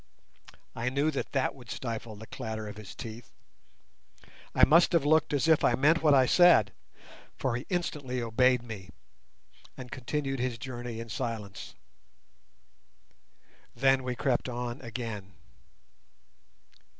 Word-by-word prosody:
I 120 +2 -1
knew 140 +4 +1
that 140 - -4
that 135 -2 +1
would 125 -5 -15
stifle 115 -1 -5
the 110 +2 -10
clatter 110 -1 -6
of 105 0 -8
his 105 -2 -10
teeth. 115 +1 -9 1.3
I - - +7
must 170 +4 +5
have 165 -4 +3
looked 155 +1 +3
as 145 +1 +1
if 160 -2 +4
I - - +4
meant 155 +5 +3
what 150 -3 +5
I 130 -1 +5
said, 125 - +5 0.6
for 130 -3 -1
he 125 - -5
instantly 150 -8 -2
obeyed 125 +2 +2
me, 105 -6 -8 0.9
and 125 -1 -9
continued 135 +1 -3
his 125 -1 -1
journey 120 -1 -6
in 115 0 -7
silence. 105 -2 -5 2.0
Then 135 +1 +3
we 125 -1 -3
crept 130 -1 0
on 120 +1 -4
again. 115 -5 -6
125 Hz, 135 wpm, -29 LUFS, 115-140 Hz, 2.0 s, I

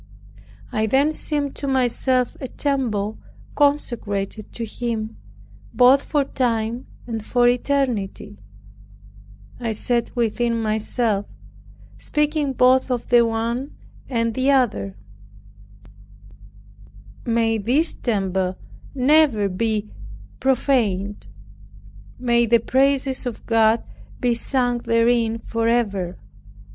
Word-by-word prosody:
I 220 0 0
then 275 +7 +2
seemed 290 -3 +1
to 280 - -4
myself 255 -1 +1
a 260 - -4
temple 235 -7 -2 0.3
consecrated 225 -8 -1
to 230 - -4
Him, 225 -1 -4 0.6
both 260 +2 +6
for 290 -1 0
time 235 -2 -2 0.2
and 225 -3 -5
for 245 +2 +2
eternity. 245 - -1 1.2
I 230 -2 -2
said 235 +2 -1
within 235 0 0
myself, 215 -1 0 0.7
(speaking 300 -2 0
both 255 +1 +4
of 245 -2 -3
the 240 -1 +6
one 230 +4 -2 0.3
and 230 -3 0
the 260 +3 0
other) 215 - +1 2.3
"May 225 -1 +1
this 260 +11 +3
temple 190 -5 -1 0.4
never 265 -6 +3
be 215 +2 -2 0.5
profaned; 225 -7 0 0.9
may 235 -1 +2
the 235 +1 +5
praises 265 +1 +1
of 240 - -7
God 225 0 +3 0.4
be 245 -1 +1
sung 245 0 0
therein 230 0 +2
forever!" 225 -6 -1
235 Hz, 95 wpm, -22 LUFS, 220-260 Hz, 2.3 s, both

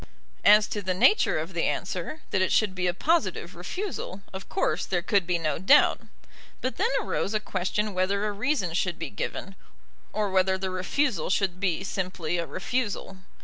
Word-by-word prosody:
As 210 +1 +7
to 205 - -3
the 185 -1 -1
nature 255 - +4
of - - -4
the - - 0
answer, 310 - -3
that 190 - +2
it 185 - +1
should 210 -3 +3
be 180 -1 -1
a - - +3
positive 205 - 0
refusal, 195 - -5
of 190 0 -8
course - - 0
there 175 -2 0
could 195 -2 +2
be 175 -1 +2
no 155 -3 -1
doubt; 235 - +5 0.6
but 255 - -3
then 445 +5 +2
arose 210 - -2
a - - +3
question 210 +1 -2
whether 195 +3 +1
a 210 - 0
reason 205 - -1
should 175 -1 0
be 165 -3 -5
given, 105 - -5 0.6
or 210 -2 -1
whether 190 0 +3
the 190 0 -3
refusal 205 +7 0
should 190 -2 0
be 185 -2 0
simply 180 -3 -2
a 170 - -2
refusal. 215 -6 -3
190 Hz, 185 wpm, -27 LUFS, 180-210 Hz, 0.6 s, As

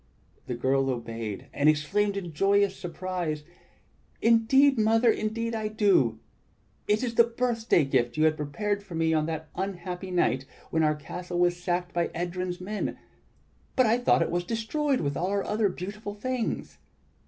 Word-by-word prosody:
The 125 - -2
girl 135 +2 +1
obeyed, 115 -4 -4
and 145 +1 +4
exclaimed 200 +7 +1
in 175 -4 -5
joyous 200 +4 +3
surprise: 175 -3 -4 0.8
"Indeed, 235 +4 +4
Mother, 225 +2 +4
indeed 230 +2 -2
I 220 -1 -1
do! 195 - +3 0.7
It 210 +3 +2
is 240 -2 -1
the 235 - +6
birthday 230 - +1
gift 125 -1 0
you 155 - +3
had 155 0 +4
prepared 200 +8 -2
for 195 -4 -9
me 160 0 +2
on 155 -1 +1
that 160 -1 -4
unhappy 185 -1 -4
night 135 -7 +1 0.3
when 160 - +2
our 155 -1 +3
castle 175 +4 -6
was 175 0 +2
sacked 180 0 -1
by 170 -1 +1
Edrjm's 180 +1 -3
men; 205 +3 -3 0.8
but 255 - +5
I 230 +2 +3
thought 245 - +3
it - - -3
was 175 +1 0
destroyed 255 - -1
with 140 -2 -1
all 180 - -1
our 200 0 0
other 210 -1 +1
beautiful 205 +3 -6
things." 250 +2 -3
185 Hz, 165 wpm, -27 LUFS, 155-215 Hz, 0.8 s, the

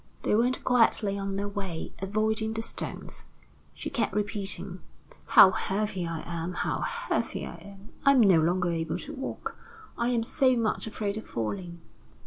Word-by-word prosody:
They - - +1
went 245 +4 +2
quietly 230 -4 +3
on 195 0 -3
their 200 +1 -1
way, 195 -5 -5
avoiding 215 +3 0
the 225 0 -2
stones. - - -4 0.5
She - - -5
kept 230 -5 0
repeating: 205 -1 -2 0.5
"How 190 - +9
heavy 195 -2 -1
I 165 -1 -4
am! 170 +1 -3
How - - -1
heavy 480 +1 -2
I - - -7
am! 200 +1 -13
I 275 - +7
am 260 - +6
no 190 -6 +6
longer 175 +2 +1
able 165 -1 -1
to 300 - -7
walk. 270 -2 -5 0.4
I 235 +1 +2
am 235 -2 +1
so 255 +1 +3
much 225 -1 0
afraid 210 -1 -2
of 220 - -7
falling!" 170 - -4
205 Hz, 165 wpm, -28 LUFS, 185-225 Hz, 0.5 s, How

